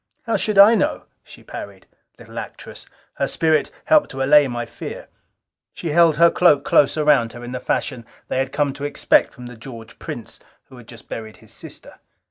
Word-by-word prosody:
"How 230 Hz, -2 st, -1 dB
should 210 Hz, 0 st, -1 dB
I 200 Hz, +3 st, +9 dB
know?" 210 Hz, -, 0 dB, 0.2 s
she -, -, -16 dB
parried. 100 Hz, -2 st, -9 dB, 0.3 s
Little -, -, -9 dB
actress! -, -, -10 dB, 0.3 s
Her -, -, 0 dB
spirit 160 Hz, -1 st, +1 dB, 0.2 s
helped 305 Hz, -1 st, +4 dB
to 135 Hz, 0 st, -3 dB
allay 145 Hz, +1 st, +5 dB
my 120 Hz, -1 st, -4 dB
fear. -, -, -9 dB, 0.7 s
She 170 Hz, -, -5 dB
held 165 Hz, 0 st, +4 dB
her 170 Hz, +1 st, +6 dB
cloak 150 Hz, -6 st, +3 dB
close 145 Hz, -, +3 dB
around 145 Hz, -7 st, +2 dB
her 120 Hz, -, -10 dB
in 120 Hz, -, -7 dB
the 125 Hz, -, -4 dB
fashion 115 Hz, -2 st, -3 dB, 0.2 s
they -, -, -2 dB
had 135 Hz, 0 st, -1 dB
come 145 Hz, -1 st, 0 dB
to 140 Hz, -, -9 dB
expect 145 Hz, -, +2 dB
from 125 Hz, -, -12 dB
the 120 Hz, 0 st, -10 dB
George 115 Hz, -1 st, -12 dB
Prince -, -, -8 dB, 0.3 s
who 130 Hz, -, -14 dB
had 120 Hz, -2 st, -14 dB
just 115 Hz, -2 st, -14 dB
buried 110 Hz, -1 st, -8 dB
his -, -, -15 dB
sister. -, -, -10 dB
140 Hz, 195 wpm, -21 LUFS, 120-160 Hz, 0.7 s, I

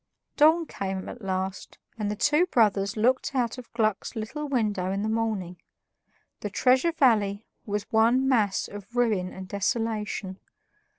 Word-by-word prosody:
Dawn 320 Hz, +3 st, +5 dB
came 190 Hz, -7 st, -4 dB
at 245 Hz, -, -9 dB
last, 190 Hz, -1 st, -4 dB, 0.2 s
and 210 Hz, -3 st, -2 dB
the 210 Hz, -, -2 dB
two 300 Hz, -, +3 dB
brothers 210 Hz, -, +2 dB
looked 255 Hz, +5 st, +1 dB
out 245 Hz, -1 st, 0 dB
of 245 Hz, -, -12 dB
Gluck's 215 Hz, -1 st, -1 dB
little 260 Hz, +8 st, -4 dB
window 210 Hz, -8 st, 0 dB
in 195 Hz, +1 st, -2 dB
the -, -, -1 dB
morning. 215 Hz, -6 st, -2 dB, 0.8 s
The 210 Hz, -, -4 dB
Treasure 255 Hz, +10 st, +3 dB
Valley 215 Hz, -8 st, +2 dB, 0.2 s
was 205 Hz, 0 st, -1 dB
one 235 Hz, +4 st, +3 dB
mass 215 Hz, -7 st, +2 dB
of 205 Hz, +3 st, -11 dB
ruin 215 Hz, -7 st, +1 dB
and 190 Hz, 0 st, -8 dB
desolation. 210 Hz, -1 st, -2 dB
215 Hz, 145 wpm, -26 LUFS, 200-245 Hz, 0.8 s, Dawn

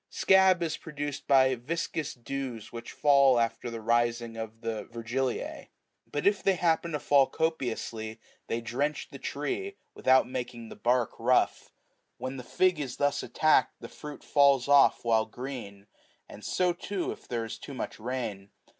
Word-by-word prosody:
Scab95 190 Hz, -2 st, +5 dB
is 160 Hz, -, -2 dB
produced 145 Hz, -2 st, -6 dB
by 130 Hz, -1 st, +5 dB
viscous 155 Hz, +5 st, -3 dB
dews 125 Hz, -2 st, -5 dB
which 115 Hz, 0 st, -7 dB
fall 140 Hz, -4 st, +5 dB
after 115 Hz, +1 st, -1 dB
the 115 Hz, -1 st, -6 dB
rising 120 Hz, 0 st, +1 dB
of 115 Hz, 0 st, -7 dB
the 115 Hz, -2 st, -3 dB
Yergiliae; 120 Hz, +2 st, -3 dB, 0.4 s
but 145 Hz, -, -2 dB
if 200 Hz, 0 st, +3 dB
they 195 Hz, -, +3 dB
happen 170 Hz, -1 st, +1 dB
to 150 Hz, -, -1 dB
fall 140 Hz, -2 st, +4 dB
copiously, 115 Hz, -8 st, -3 dB, 0.3 s
they 115 Hz, -, -2 dB
drench 140 Hz, +6 st, -2 dB
the -, -, -9 dB
tree, 395 Hz, +1 st, -3 dB, 0.2 s
without 130 Hz, -1 st, +4 dB
making 120 Hz, -2 st, -5 dB
the -, -, -9 dB
bark 120 Hz, -1 st, +1 dB
rough. 125 Hz, +2 st, +2 dB, 0.5 s
When 130 Hz, +1 st, -5 dB
the 125 Hz, -, -7 dB
fig 185 Hz, +5 st, +2 dB
is 135 Hz, -4 st, -4 dB
thus 145 Hz, 0 st, +1 dB
attacked, 155 Hz, 0 st, +2 dB
the -, -, -9 dB
fruit 150 Hz, -1 st, -10 dB
falls 140 Hz, -3 st, +4 dB
off 140 Hz, -3 st, +5 dB
while 110 Hz, -1 st, +3 dB
green; 115 Hz, -5 st, -7 dB, 0.4 s
and 105 Hz, -, -12 dB
so, 180 Hz, -1 st, +1 dB
too, 185 Hz, +1 st, -3 dB
if -, -, -11 dB
there 115 Hz, -2 st, -2 dB
is 115 Hz, 0 st, -7 dB
too 140 Hz, -, -8 dB
much -, -, -5 dB
rain. 110 Hz, -5 st, -4 dB
130 Hz, 165 wpm, -29 LUFS, 115-150 Hz, 0.5 s, Scab95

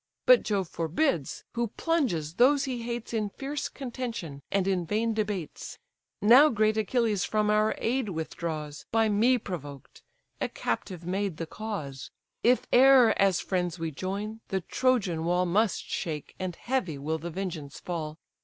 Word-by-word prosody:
But -, -, +7 dB
Jove 195 Hz, -4 st, -1 dB
forbids, 165 Hz, -, -1 dB
who 235 Hz, 0 st, -1 dB
plunges 210 Hz, -, -1 dB
those 270 Hz, +7 st, +4 dB
he 255 Hz, -4 st, -3 dB
hates 235 Hz, 0 st, -5 dB
In 215 Hz, -2 st, 0 dB
fierce 280 Hz, +7 st, -4 dB
contention 235 Hz, -, -5 dB
and 195 Hz, -1 st, +1 dB
in 185 Hz, -2 st, +1 dB
vain 220 Hz, +6 st, 0 dB
debates: 205 Hz, -7 st, -4 dB, 0.5 s
Now 255 Hz, +8 st, +8 dB
great 215 Hz, -2 st, +2 dB
Achilles 220 Hz, -2 st, +1 dB
from 210 Hz, -1 st, +1 dB
our 215 Hz, +1 st, +2 dB
aid 245 Hz, -1 st, 0 dB
withdraws, 160 Hz, -3 st, -5 dB
By 225 Hz, -1 st, +3 dB
me 230 Hz, +5 st, +4 dB
provoked; 145 Hz, -, -8 dB, 0.4 s
a -, -, 0 dB
captive 170 Hz, -, -4 dB
maid 190 Hz, -1 st, -2 dB
the 165 Hz, -, -3 dB
cause: 160 Hz, -, -6 dB, 0.3 s
If 250 Hz, +1 st, +3 dB
e'er 255 Hz, -2 st, +7 dB
as 195 Hz, -2 st, +3 dB
friends 180 Hz, -2 st, -1 dB
we 165 Hz, -1 st, -3 dB
join, 200 Hz, +7 st, -4 dB
the 190 Hz, -1 st, -1 dB
Trojan 195 Hz, -6 st, +1 dB
wall 180 Hz, +2 st, +2 dB
Must 200 Hz, +4 st, +1 dB
shake, 155 Hz, -5 st, -4 dB
and 185 Hz, -2 st, -3 dB
heavy 215 Hz, -, -2 dB
will 155 Hz, +3 st, -2 dB
the 170 Hz, +3 st, -5 dB
vengeance 160 Hz, -5 st, -5 dB
fall! 160 Hz, -3 st, -4 dB
200 Hz, 155 wpm, -28 LUFS, 165-235 Hz, 0.5 s, Now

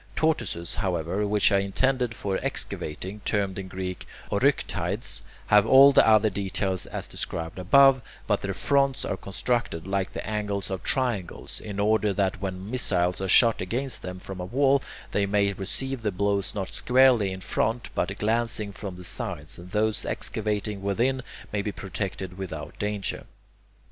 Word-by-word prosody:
Tortoises, 120 Hz, -, -1 dB
however, 95 Hz, +1 st, -1 dB
which 105 Hz, +1 st, +3 dB
are 100 Hz, -, +4 dB
intended 125 Hz, +4 st, 0 dB
for 100 Hz, -2 st, -2 dB
excavating, 95 Hz, +7 st, -3 dB
termed 100 Hz, -3 st, -1 dB
in 95 Hz, -, -6 dB
Greek 95 Hz, -1 st, -5 dB, 0.2 s
[Greek: -, -, 0 dB
oryktides], -, -, 0 dB, 0.2 s
have 105 Hz, +1 st, +5 dB
all 135 Hz, +3 st, +9 dB
the -, -, +6 dB
other 110 Hz, -1 st, +5 dB
details 95 Hz, -1 st, -2 dB
as -, -, -4 dB
described 80 Hz, +2 st, -3 dB
above, 135 Hz, +7 st, +6 dB, 0.2 s
but -, -, +1 dB
their 100 Hz, -1 st, -3 dB
fronts 140 Hz, +1 st, +1 dB
are -, -, -1 dB
constructed 100 Hz, -3 st, -2 dB
like 95 Hz, 0 st, -1 dB
the -, -, -5 dB
angles 105 Hz, -2 st, -2 dB
of 95 Hz, -, -3 dB
triangles, 120 Hz, -10 st, -1 dB
in 100 Hz, -2 st, -6 dB
order 105 Hz, 0 st, +2 dB
that 95 Hz, 0 st, 0 dB
when 95 Hz, +1 st, -4 dB
missiles 90 Hz, -8 st, +1 dB
are 95 Hz, -, -1 dB
shot 115 Hz, +4 st, +5 dB
against 125 Hz, +8 st, -3 dB
them 90 Hz, 0 st, -6 dB
from 95 Hz, 0 st, -8 dB
a 90 Hz, -, -3 dB
wall, 135 Hz, +6 st, +3 dB, 0.3 s
they 100 Hz, -1 st, +1 dB
may 100 Hz, 0 st, +2 dB
receive 125 Hz, +7 st, -3 dB
the 105 Hz, -2 st, 0 dB
blows 100 Hz, +1 st, -1 dB
not 95 Hz, -2 st, -4 dB
squarely 125 Hz, -6 st, +4 dB
in 95 Hz, -, -5 dB
front, 115 Hz, +5 st, -1 dB
but -, -, -1 dB
glancing 110 Hz, -1 st, 0 dB
from 100 Hz, -2 st, -7 dB
the 90 Hz, -, -9 dB
sides, 75 Hz, -3 st, -5 dB
and 90 Hz, +1 st, -11 dB
those 105 Hz, +1 st, 0 dB
excavating 105 Hz, -2 st, -2 dB
within 120 Hz, +7 st, +1 dB, 0.3 s
may 105 Hz, -, +1 dB
be 105 Hz, -, -3 dB
protected 95 Hz, -2 st, -5 dB
without 95 Hz, -2 st, -6 dB
danger. 105 Hz, -1 st, -3 dB
100 Hz, 165 wpm, -26 LUFS, 95-115 Hz, 0.3 s, all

